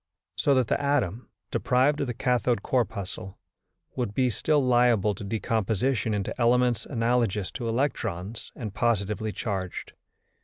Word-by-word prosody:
So 140 - +3
that 130 -1 +3
the - - 0
atom, 130 -6 0 0.2
deprived 130 +4 +2
of 140 - -1
the 120 - -3
cathode 120 -3 +1
corpuscle, 100 -6 -2 0.6
would 120 -5 -2
be 130 -2 +2
still 150 +6 +2
liable 120 -4 +4
to 100 - -8
decomposition 110 +2 0
into 100 -2 -2
elements 120 0 +3
analogous 115 -5 0
to 120 -3 -4
electrons 115 -5 -2
and 105 -4 -6
positively 110 -1 0
charged. 95 -5 -4
115 Hz, 130 wpm, -27 LUFS, 105-125 Hz, 0.6 s, liable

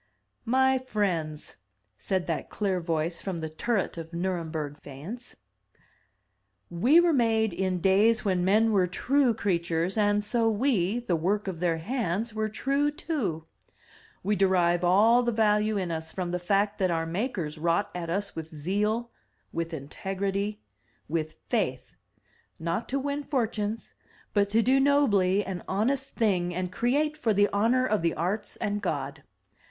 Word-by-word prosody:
"My 265 +2 +3
friends, 180 -11 -2 0.4
said 190 -3 -1
that 165 - -3
clear 195 -3 -1
voice 165 0 -1
from 190 -3 -4
the 160 -1 -4
turret 190 +2 -1
of 165 +1 -9
Nurem 175 -2 -2
berg 150 -2 -4
faience. 170 - -9 1.4
"We 245 - +5
were 345 -1 +4
made 225 -5 +2
in 185 0 -1
days 210 +5 +3
when 185 -3 +1
men 215 +4 +4
were 190 -4 +3
true 255 +6 +2
crea 195 -5 +1
tures, 170 +4 -1
and 205 0 +2
so 225 +2 +2
we, 225 -2 +1
the 190 -8 0
work 195 +6 0
of 180 -4 -4
their 170 -2 +1
hands, 220 +2 -2
were 215 0 -1
true 275 +6 0
too. 255 - -3 0.8
We 205 +3 +1
derive 180 -3 +2
all 215 +7 +5
the 240 -1 0
value 215 -1 +2
in 185 -3 -2
us 160 0 -4
from 180 -2 -3
the 180 - -1
fact 200 +4 +1
that 185 -1 +2
our 165 -1 0
makers 170 - -3
wrought 170 +5 +1
at 170 -2 -5
us 200 +4 -2
with 160 -1 -5
zeal, 210 +9 -1 0.4
with 165 0 -3
integrity, 195 +7 -3 0.5
with 155 0 -2
faith 130 - -2 0.3
— - - -38 0.3
^not 170 +7 -2
to 275 - -1
win 285 +1 -2
fortunes, 225 -6 -2 0.4
but 200 -1 +2
to 225 +2 +3
do 265 +3 +4
nobly 205 -9 +3
an 185 -2 -5
honest 260 +8 0
thing 180 -6 +1
and 180 0 -2
create 280 +9 +1
for 225 -7 0
the 205 +1 +5
honor 235 +5 +3
of 215 -6 +1
the 165 -1 0
Arts 190 +6 -2
and 205 0 -2
God. - - -3
200 Hz, 160 wpm, -27 LUFS, 170-225 Hz, 1.4 s, We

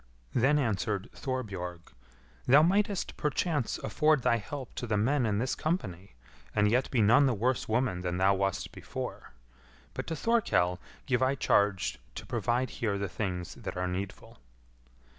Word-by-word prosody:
Then 135 +5 +3
answered 105 -4 -1
Thorbjorg, 95 -10 -5 0.6
"Thou 140 +4 +7
mightest 200 +2 +1
perchance 150 -3 0
afford 155 -4 +2
thy 115 - +3
help 130 +4 -7
to 120 - -5
the 105 -1 +1
men 125 +4 +2
in 105 -1 0
this 125 +4 0
company, 100 - -3 0.4
and 105 0 +4
yet 125 +2 +2
be 120 -5 +2
none 120 +7 +6
the 125 - +1
worse 120 +4 0
woman 115 -5 +1
than 90 0 -2
thou 95 +1 +4
wast 95 0 -1
before; - - -7 0.6
but - - -5
to 165 - -2
Thorkell 150 - +1 0.3
give 125 -2 +1
I 130 +1 +3
charge 100 - +1 0.2
to - - -7
provide 125 +2 0
here 105 -4 +1
the 100 0 -2
things 90 -2 -4
that - - -7
are 90 0 -1
needful." 95 +2 -6
115 Hz, 160 wpm, -30 LUFS, 95-135 Hz, 0.6 s, Thou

